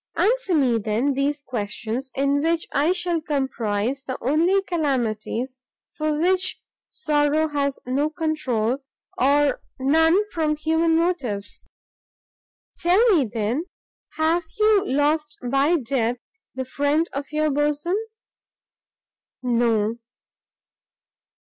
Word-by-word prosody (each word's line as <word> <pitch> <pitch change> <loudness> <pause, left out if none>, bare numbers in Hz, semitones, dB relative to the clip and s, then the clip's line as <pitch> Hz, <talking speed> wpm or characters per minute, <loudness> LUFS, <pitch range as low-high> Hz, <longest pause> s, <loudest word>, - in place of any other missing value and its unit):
"Answer 475 -5 +2
me, 250 -6 +3
then, 225 +6 0
these 285 +2 -1
questions, 235 +2 -4
in 280 +1 +1
which 330 +1 +1
I 295 +5 +3
shall 350 -3 0
comprise 265 -4 -1
the 260 -1 -4
only 335 +9 +2
calamities 255 - -2 0.3
for 305 -1 -1
which 370 +2 +1 0.3
sorrow 300 -3 +1
has 280 -2 -1
no 275 +4 0
controul, 280 -7 -1 0.4
or 285 +2 +2 0.2
none 320 +6 +4
from 310 -2 0
human 320 +2 +1
motives. 265 - -1 1.1
Tell 370 +8 +4
me, 290 -6 +3
then, 235 +8 -1 0.5
have 325 +2 +1
you 425 -2 +4
lost 295 +2 0
by 275 +7 +3
death 245 -3 -1 0.4
the 260 0 -3
friend 290 +5 +1
of 280 +1 -5
your 305 0 +1
bosom?" 295 +5 0 1.5
"No!" 230 -2 +1
290 Hz, 105 wpm, -23 LUFS, 255-320 Hz, 1.5 s, none